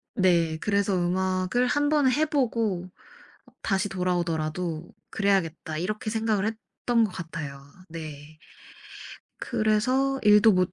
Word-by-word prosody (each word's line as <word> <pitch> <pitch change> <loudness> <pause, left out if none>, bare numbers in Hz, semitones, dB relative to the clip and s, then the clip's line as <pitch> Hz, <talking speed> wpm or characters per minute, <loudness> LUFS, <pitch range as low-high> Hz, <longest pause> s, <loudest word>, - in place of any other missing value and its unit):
네 170 -4 +2
그래서 200 -1 +1
'음악을 185 +6 0
1 290 +3 +1
번은 290 -4 +3
해 300 +4 +2
보고 225 - -1 0.7
다시 195 0 0
돌아오더라도 170 -2 -2 0.2
그래야겠다.' 170 -5 0
이렇게 215 +4 -3
생각을 220 -2 0
했던 225 +1 -1
것 210 - -2
같아요. 155 -5 -7 0.3
네. 155 -2 -9 1.0
그래서 255 +6 +1
일도 210 +1 +6
못 180 -1 +1
190 Hz, 245 characters per minute, -26 LUFS, 170-225 Hz, 1.0 s, 일도